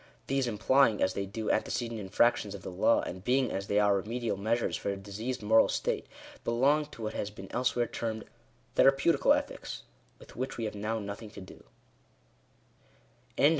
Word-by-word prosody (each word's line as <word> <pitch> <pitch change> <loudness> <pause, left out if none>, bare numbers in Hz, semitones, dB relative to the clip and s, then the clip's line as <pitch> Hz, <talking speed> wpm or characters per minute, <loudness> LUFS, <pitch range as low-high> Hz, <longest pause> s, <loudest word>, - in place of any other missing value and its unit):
These 135 -1 0
implying, 115 +1 +3
as 95 - +2
they 100 0 -3
do, 105 +2 -2
antecedent 115 -2 -1
infractions 105 +1 +2
of 95 - -10
the - - -6
law, 95 +5 +3
and 95 0 -6
being, 130 +2 +2
as 100 0 -3
they 100 - +2
are, 105 -1 +4
remedial 115 +4 -2
measures 110 +4 0
for - - -3
a 100 - -2
diseased 105 +5 -5
moral 110 +2 +5
state, - - -1 0.4
belong 140 +6 +2
to 115 - -10
what 110 - -3
has 100 - -3
been 95 -2 -11
elsewhere 125 0 +1
termed 110 -1 -4 0.5
Thera 135 - +7
peutical 165 +4 +4
Ethics, - - -6 0.3
with - - -15
which 130 +3 -4
we 115 - -2
have 105 - -3
now 105 +2 -2
nothing 105 +1 -6
to 100 - -10
do. 95 - -13
110 Hz, 175 wpm, -30 LUFS, 100-120 Hz, 0.5 s, Thera